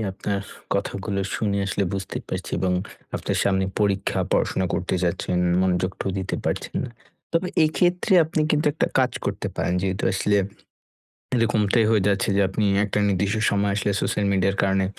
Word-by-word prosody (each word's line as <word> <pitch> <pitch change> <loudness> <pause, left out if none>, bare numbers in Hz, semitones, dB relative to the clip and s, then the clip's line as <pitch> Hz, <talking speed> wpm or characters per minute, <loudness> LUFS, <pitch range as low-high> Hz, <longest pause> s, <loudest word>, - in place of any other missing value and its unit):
আপনার 100 +1 -2 0.3
কথাগুলো 100 0 -2
শুনে 100 -2 0
আসলে 100 0 0
বুঝতে 95 0 -4
পারছি - - -4
এবং 90 +1 +1 0.4
আপনার - - -2
সামনে 95 -1 +2 0.2
পরীক্ষা, 100 -2 +1
পড়াশোনা 95 - +1
করতে 90 - -1
যাচ্ছেন, 90 +1 -1 0.2
মনোযোগটাও 95 +1 0
দিতে 95 0 -2
পারছেন - - -2
না। 125 - -6 0.4
তবে 170 +2 +1 0.2
এক্ষেত্রে 180 +5 +2
আপনি 160 0 -2
কিন্তু 150 +1 +2
একটা 155 - 0
কাজ 130 -2 +3
করতে - - -2
পারেন। 90 - 0
যেহেতু 95 0 -1
আসলে 100 +1 +1 1.0
এরকমটাই 115 -2 +2
হয়ে 110 -3 +3
যাচ্ছে 100 0 +1
যে, 100 - +3
আপনি 105 +2 -1 0.2
একটা 105 0 -1
নির্দিষ্ট 100 +2 +1 0.2
সময় 100 0 +1
আসলে 100 0 0
সোশ্যাল 105 - 0
মিডিয়ার 95 +1 +1
কারণে 95 0 +2
100 Hz, 155 wpm, -24 LUFS, 95-110 Hz, 1.0 s, কাজ